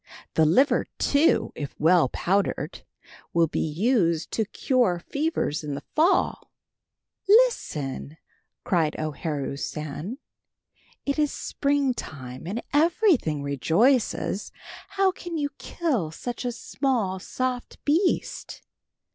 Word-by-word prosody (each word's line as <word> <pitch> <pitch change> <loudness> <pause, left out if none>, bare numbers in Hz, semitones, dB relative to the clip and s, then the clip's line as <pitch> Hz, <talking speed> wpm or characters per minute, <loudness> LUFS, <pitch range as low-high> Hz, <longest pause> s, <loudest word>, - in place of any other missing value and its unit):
"The 160 - +4
liver, 260 - +3
too, 285 +3 +3
if 145 -2 -7
well 165 -3 +5
powdered, 195 +8 -1 0.5
will 170 -1 +5
be 155 - -3
used 170 - +1
to 220 - 0
cure 235 -3 +1
fevers 280 - -2
in 145 -2 -3
the 140 - -7
fall." 330 +5 +2 0.8
"Listen," 160 - +2 0.5
cried 160 -4 +1
O 155 0 -2
Haru 145 -2 -3
San, 155 - -5 0.9
"It 280 +2 0
is 295 -2 +2
springtime, 240 - -2
and 215 +6 -3
everything 310 - +3
rejoices. 195 - +1 0.4
How 390 -1 +2
can 350 -2 -6
you 290 -2 -1
kill 265 - -1
such 245 +10 -6
a 245 - 0
small 230 -5 -1
soft 250 +5 -3
beast? 335 +6 0
210 Hz, 110 wpm, -25 LUFS, -, 0.9 s, well